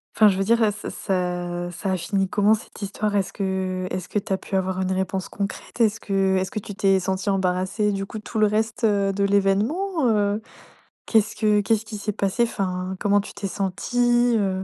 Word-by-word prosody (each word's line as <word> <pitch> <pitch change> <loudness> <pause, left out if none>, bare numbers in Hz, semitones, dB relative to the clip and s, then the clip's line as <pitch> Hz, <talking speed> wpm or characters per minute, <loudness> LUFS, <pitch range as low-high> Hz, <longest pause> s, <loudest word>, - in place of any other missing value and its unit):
enfin 215 - +7
je 190 -2 +3
veux 195 - +1
dire 230 +3 +3
et 215 -2 +4
ce 205 - -7
ça 175 -2 -2
ça 190 +3 -3
a 185 - +1
fini 195 +3 0
comment 205 +2 +4
cette 220 - -5
histoire? 205 +1 -2
Est-ce 195 -2 0
que 190 -2 -2
est-ce 185 -1 -4
que 210 - 0
tu 195 - -9
as - - +1
pu 195 - -6
avoir 190 0 0
une 185 - -1
réponse 190 0 -2
concrète? 200 +4 -5
Est-ce 225 0 +3
que 195 -1 +1
est-ce 185 0 -1
que 215 - -2
tu 205 0 -8
t'es 195 -1 +3
senti 190 +2 -2
embarrassé 190 +2 +1
du 195 0 -2
coup 215 - -7
tout 220 +1 -7
le 215 - +5
reste, 220 +3 -1
heu, 200 -2 +2
de 200 +1 0
l'événement, 220 - +1
heu? 210 0 +1 0.7
Qu'est-ce 215 -1 +2
que 210 -1 +3
qu'est-ce 220 +1 +1
qui 215 -1 -6
s'est 210 +1 -3
passé? 200 +5 +1
Enfin 185 -4 -2
comment 205 -1 +3
tu 200 - -6
t'es 200 - -4
sentie, 240 +5 +1
heu? 190 -2 0
200 Hz, 215 wpm, -23 LUFS, 190-215 Hz, 0.7 s, enfin